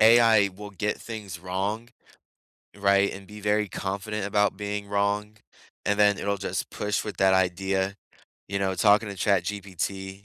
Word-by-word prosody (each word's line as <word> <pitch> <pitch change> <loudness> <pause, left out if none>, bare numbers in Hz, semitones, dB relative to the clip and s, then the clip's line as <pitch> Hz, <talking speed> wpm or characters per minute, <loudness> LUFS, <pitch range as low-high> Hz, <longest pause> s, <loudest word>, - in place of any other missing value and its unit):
AI 110 -2 +6
will 105 0 -8
get 105 +2 -2
things 105 -6 -7
wrong, 100 +6 -3 0.9
right? 100 0 +3
And 95 0 -9
be 105 0 -10
very 105 0 +1
confident 100 +2 -3
about 105 -1 +2
being 105 0 -4
wrong. 105 +1 0 0.5
And 105 +1 +1
then 105 -1 +5
it'll 100 0 -1
just - - -3
push 105 0 -2
with 105 - -6
that 95 -1 +4
idea, 95 +1 +1 0.5
you 100 - -1
know, 95 -1 0
talking 105 +3 +4
to 100 - -5
ChatGPT 95 0 -2
100 Hz, 150 wpm, -26 LUFS, 95-105 Hz, 0.9 s, AI